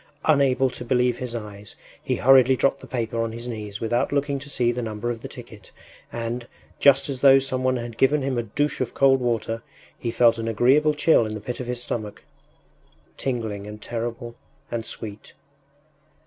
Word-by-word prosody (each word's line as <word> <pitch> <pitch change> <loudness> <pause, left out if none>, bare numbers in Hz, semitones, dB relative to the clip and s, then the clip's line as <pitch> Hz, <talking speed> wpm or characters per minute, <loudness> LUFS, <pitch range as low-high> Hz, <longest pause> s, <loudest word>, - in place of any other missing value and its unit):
Unable 135 -4 +3
to 125 - -7
believe 125 0 +1
his 125 -2 -4
eyes, 105 -2 -8 0.3
he - - -1
hurriedly 130 0 +6
dropped 135 +1 +1
the - - -11
paper 115 -2 -2
on 115 -1 -2
his 115 +1 -6
knees 105 -4 -6
without 120 +2 0
looking 140 0 0
to 140 +1 -9
see 120 -4 +1
the 125 +1 -3
number 110 +1 -3
of 115 -1 -6
the - - -6
ticket, - - -12 0.4
and, 120 +1 -4 0.3
just 140 -1 +5
as 135 -3 -4
though 135 0 +7
some 130 -1 -1
one 130 0 +2
had 120 -1 -7
given 145 +1 +3
him 135 -1 -1
a 120 - +1
douche 145 +7 -2
of - - -3
cold 135 -1 +4
water, 115 -2 -1 0.4
he 120 - -3
felt 115 0 +3
an 115 - -3
agreeable 135 +7 +3
chill 150 -3 +4
in 110 - -5
the - - -5
pit 120 +4 -6
of 125 - -5
the 125 - -2
stomach; 115 -3 -5 0.9
tingling 110 -6 -3
and 105 0 -8
terrible 120 0 -4 0.4
and 115 -1 -3
sweet! 105 -1 -8
120 Hz, 190 wpm, -24 LUFS, 115-135 Hz, 0.9 s, though